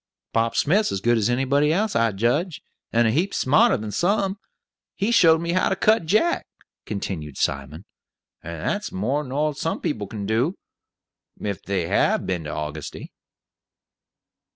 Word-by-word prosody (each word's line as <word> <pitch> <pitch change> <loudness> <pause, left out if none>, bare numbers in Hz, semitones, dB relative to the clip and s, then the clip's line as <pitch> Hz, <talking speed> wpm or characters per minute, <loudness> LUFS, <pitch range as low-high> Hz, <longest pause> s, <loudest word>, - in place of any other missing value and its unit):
"Bob 115 0 +1
Smith's 200 +8 +2
as 100 - -2
good 120 +4 +2
as 110 0 +1
anybody 135 +4 +2
else, 210 +6 0
I 115 -1 +3
judge; 120 - -1 0.3
and 120 0 +3
a - - +2
heap 175 - 0
smarter 140 +4 +4
than 110 -2 -5
some. 195 - 0 0.6
He 205 +4 0
showed 165 -8 +6
me 170 0 -2
how 185 +1 +2
to 190 - +1
cut 215 -3 +2
Jack," 275 - +2 0.4
continued 80 -9 -5
Simon, 70 +6 -2 0.6
"and 85 -1 -6
that's - - -2
more 130 +10 -1
nor 150 +3 -1
some 160 +3 -3
people 105 -7 -3
can 105 -1 -6
do, 120 - +1 0.8
if 100 -3 -4
they 95 -4 -2
have - - +2
been 90 -4 -2
to - - -5
Augusty." 75 0 -6
120 Hz, 155 wpm, -23 LUFS, -, 0.8 s, showed